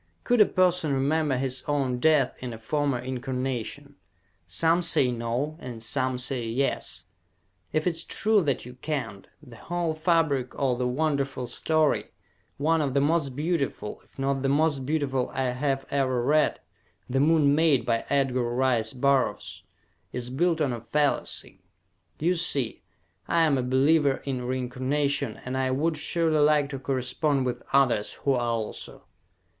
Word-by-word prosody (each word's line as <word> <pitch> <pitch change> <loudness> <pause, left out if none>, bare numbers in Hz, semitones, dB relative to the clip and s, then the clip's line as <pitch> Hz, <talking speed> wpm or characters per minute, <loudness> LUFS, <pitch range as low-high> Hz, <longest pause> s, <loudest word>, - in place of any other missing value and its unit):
Could 245 -3 +3
a 210 - +7
person 180 -4 +2
remember 145 +1 +1
his 130 0 -2
own 135 -4 0
death 150 -2 +3
in 125 -2 -5
a - - -7
former 140 +4 -1
incarnation? 130 +2 -4 0.5
Some 165 - +3
say 135 -7 +2
"no," 120 +6 -2
and 120 -6 -8
some 130 +2 -1
say 125 -1 -3
"yes." 115 -6 -2 0.7
If 155 0 0
it 180 - +3
is 165 0 -3
true 215 -1 +2
that 140 -8 -1
you 125 - -9
can't, 125 -8 -5 0.2
the 120 -5 -13
whole 175 +2 -2
fabric 155 -6 +1
of 130 -3 0
the 125 - +1
wonderful 135 -1 -1
story, 155 +5 +1 0.5
one 160 +3 +2
of 140 -2 -2
the - - +5
most 145 -2 +1
beautiful, 150 -8 -2
if - - -27
not 135 0 0
the 135 - 0
most 145 -2 +1
beautiful 140 -4 0
I 130 -1 0
have 135 +2 -1
ever 130 -3 +1
read, 150 +4 +2 0.5
"The 135 +2 0
Moon 150 -1 +4
Maid," 150 -3 +3
by 115 -2 0
Edgar 130 -4 +1
Rice 125 -3 +1
Burroughs, 135 0 0 0.5
is 125 0 -4
built 165 +4 +1
on 140 -5 +1
a 120 - -5
fallacy. 145 +4 -1 0.6
You 170 +4 +1
see, 145 -8 0 0.5
I 170 -1 +3
am 155 -3 +3
a 130 - +1
believer 135 +3 +2
in 130 -3 -3
reincarnation 130 +3 -1
and 125 +1 -3
I 130 0 0
would 155 +5 0
surely 160 +1 0
like 150 -1 +3
to 135 - -4
correspond 135 +2 0
with 125 - -3
others 130 -6 +2
who 140 - -1
are 125 - +1
also! 115 -2 -4
135 Hz, 160 wpm, -26 LUFS, 125-155 Hz, 0.7 s, a